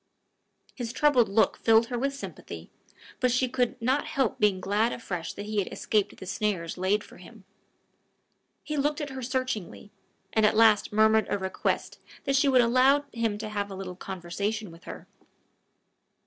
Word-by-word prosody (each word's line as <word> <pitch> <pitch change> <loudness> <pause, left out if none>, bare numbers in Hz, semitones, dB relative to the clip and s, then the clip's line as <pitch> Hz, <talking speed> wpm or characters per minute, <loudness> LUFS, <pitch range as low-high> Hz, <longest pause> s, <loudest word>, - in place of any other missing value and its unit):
His 240 -3 -5
troubled 260 -5 +3
look 220 +3 +2
filled 225 0 +4
her 245 -2 -2
with 275 +2 -1
sympathy, 280 - -9 0.5
but 250 - +2
she 250 +1 +2
could 245 0 -1
not 260 +5 0
help 270 -6 -1
being 205 -3 +3
glad 205 +5 +1
afresh 180 -8 -5
that 205 - -7
he 210 0 -1
had 195 - -2
escaped 210 -3 -1
the - - -9
snares 190 -4 -2
laid 195 +3 0
for - - -15
him. - - -14 1.2
He 300 -1 -4
looked 295 +2 0
at 290 -2 -4
her 265 0 -6
searchingly, 250 -6 -3 0.4
and 220 - +2
at 210 0 +4
last 220 -2 +5
murmured 220 +1 +4
a 205 - 0
request 190 -1 -2 0.2
that 275 -1 0
she 275 +2 +3
would 260 -2 +5
allow 260 +4 +4
him 225 -3 -1
to 215 0 -5
have 205 -1 -3
a 195 - -7
little 185 -1 -6
conversation 195 +3 -4
with 165 +1 -16
her. - - -9
220 Hz, 175 wpm, -27 LUFS, 200-255 Hz, 1.2 s, last